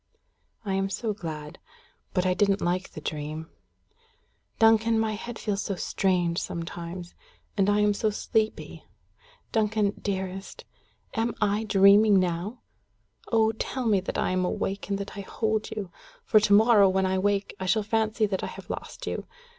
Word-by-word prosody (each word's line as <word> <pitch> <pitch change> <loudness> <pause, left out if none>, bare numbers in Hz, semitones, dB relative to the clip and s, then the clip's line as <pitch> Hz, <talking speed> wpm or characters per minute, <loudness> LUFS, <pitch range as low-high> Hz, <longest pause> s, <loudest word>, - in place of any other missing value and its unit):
"I 195 - -1
am 195 0 0
so 215 +2 -2
glad. 155 -6 -7 0.6
But 180 - +2
I 185 - +3
didn't 200 +1 +2
like 180 +2 -1
the 155 - -8
dream. 155 +2 -5 1.1
Duncan, 225 0 +4
my 220 -1 +1
head 230 +2 -6
feels 205 -2 -2
so 195 - -3
strange 175 -2 0
sometimes. 170 +1 -6 0.4
And 200 -1 +2
I 205 0 +3
am 210 0 +3
so 215 +2 0
sleepy. 215 +1 -2 0.7
Duncan, 215 -2 +1
dearest 190 -1 -4 0.5
am 230 -1 -1
I 210 +1 +1
dreaming 200 0 +6
now? 180 +6 -2 0.7
Oh! 220 -1 +4
tell 250 +3 -4
me 210 -4 +4
that 185 - -4
I - - 0
am 185 0 +1
awake 195 +2 -2
and 200 - 0
that 200 +1 -6
I 200 - -5
hold 220 +2 -1
you; 205 -4 -5 0.3
for 215 - +5
to 210 -1 0
morrow, 210 -2 +6
when 190 0 +1
I 190 0 +1
wake, 200 0 0
I 190 - -3
shall 215 +3 +2
fancy 220 +1 +1
that 195 -2 -2
I - - -1
have - - -8
lost - - -7
you. - - -4
200 Hz, 165 wpm, -27 LUFS, 185-220 Hz, 1.1 s, dreaming